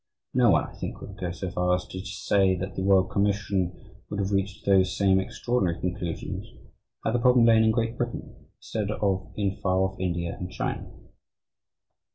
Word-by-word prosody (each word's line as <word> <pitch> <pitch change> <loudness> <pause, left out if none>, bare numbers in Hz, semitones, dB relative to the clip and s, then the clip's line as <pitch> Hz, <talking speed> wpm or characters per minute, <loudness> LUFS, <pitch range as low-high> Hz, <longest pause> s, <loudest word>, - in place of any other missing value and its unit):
No - - +5
one, - - +4
I - - -13
think, - - -6
would 100 - -9
go 90 - -2
so 90 +1 -5
far 90 0 +2
as 90 - -4
to 95 0 -6
say 100 -1 +2
that 95 +2 -4
the - - -2
Royal 95 -1 +5
Commission 100 -2 -1
would 100 - -3
have 100 0 -1
reached 100 0 -1
those 95 -1 +3
same 95 -1 +4
extraordinary 95 -3 -1
conclusions 90 -1 -4 0.6
had 110 - +1
the 120 - +2
problem 125 0 +5
lain 110 -1 +6
in - - +4
Great 115 +1 0
Britain 120 -1 -5
instead 105 -2 -3
of 100 -3 -1
in 100 -2 -1
far 95 -1 +1
off 95 0 -1
India 85 -2 -2
and 90 0 -5
China. - - -3
95 Hz, 185 wpm, -27 LUFS, 90-105 Hz, 0.6 s, lain